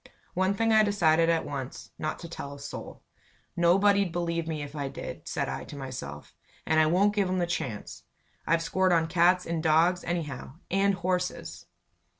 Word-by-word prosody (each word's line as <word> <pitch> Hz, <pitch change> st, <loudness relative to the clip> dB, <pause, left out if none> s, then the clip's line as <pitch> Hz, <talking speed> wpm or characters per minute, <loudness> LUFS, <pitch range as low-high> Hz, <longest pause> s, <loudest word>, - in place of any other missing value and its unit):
One 190 Hz, +2 st, +1 dB
thing 225 Hz, +1 st, +2 dB
I 220 Hz, -, +7 dB
decided 165 Hz, -6 st, +3 dB
at 165 Hz, -1 st, +2 dB
once 135 Hz, -2 st, -6 dB
not 155 Hz, -, -2 dB
to 170 Hz, -, -8 dB
tell 140 Hz, -4 st, -7 dB
a -, -, -12 dB
soul. 140 Hz, -, -8 dB, 0.5 s
"Nobody'd 195 Hz, +2 st, +4 dB
believe 170 Hz, -1 st, -2 dB
me 155 Hz, -2 st, -3 dB
if 145 Hz, +1 st, -9 dB
I 140 Hz, -2 st, -2 dB
did," -, -, -7 dB
said -, -, -1 dB
I -, -, -4 dB
to -, -, -10 dB
myself. 120 Hz, -, -7 dB, 0.3 s
"And 160 Hz, -, +3 dB
I 155 Hz, -, +5 dB
won't 195 Hz, +5 st, +3 dB
give 200 Hz, -3 st, +1 dB
'em 185 Hz, -, 0 dB
the 175 Hz, -, +1 dB
chance. 130 Hz, -11 st, -4 dB, 0.5 s
I've 165 Hz, 0 st, +2 dB
scored 185 Hz, +1 st, +2 dB
on 165 Hz, -1 st, +3 dB
cats 180 Hz, +2 st, +3 dB
and 165 Hz, -1 st, -2 dB
dogs, 165 Hz, +3 st, +3 dB
anyhow 150 Hz, -6 st, -4 dB, 0.2 s
and 195 Hz, +1 st, +3 dB
horses." 180 Hz, 0 st, -3 dB
170 Hz, 180 wpm, -28 LUFS, 155-185 Hz, 0.5 s, I